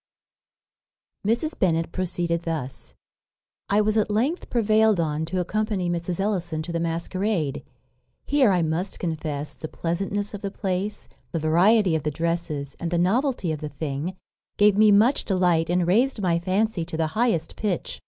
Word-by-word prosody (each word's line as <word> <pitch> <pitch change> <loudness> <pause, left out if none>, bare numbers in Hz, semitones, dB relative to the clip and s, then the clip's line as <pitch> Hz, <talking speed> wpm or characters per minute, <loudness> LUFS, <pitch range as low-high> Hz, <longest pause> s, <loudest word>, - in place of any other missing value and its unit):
_ - - +4
Mrs. 305 +8 -1
Bennet 165 -4 +1
proceeded 175 -2 -1
thus: 145 -7 -5 0.7
"I 205 +1 +4
was 215 +1 +1
at 215 -1 +2
length 250 - 0
prevailed 220 -3 +3
on 155 -1 -1
to 180 +3 -2
accompany 195 -1 -1
Mrs. 170 +1 -3
Ellison 175 -6 -1
to 170 - -6
the 170 - -1
masquerade. 170 -1 -1 0.6
Here, 280 -5 +4
I 180 -3 +2
must 165 +5 -2
confess, 155 -3 -3
the 155 - -6
pleasantness 195 +6 -3
of 205 - -6
the 200 - -3
place, 195 +1 -3 0.3
the 165 - 0
variety 175 +4 +4
of 160 - 0
the 150 - -1
dresses, 155 -3 -3
and 170 - -2
the 175 - 0
novelty 215 - +1
of 155 -1 -4
the 150 - -4
thing, 150 +5 -4 0.4
gave 205 -1 +5
me 215 0 +6
much 220 +7 +4
delight, 180 -4 +2
and 175 0 +2
raised 235 +8 +2
my 175 -4 +1
fancy 190 +1 0
to 165 -1 -5
the 160 -1 +1
highest 215 -9 0
pitch. 205 -5 -3
180 Hz, 165 wpm, -24 LUFS, 165-210 Hz, 0.7 s, me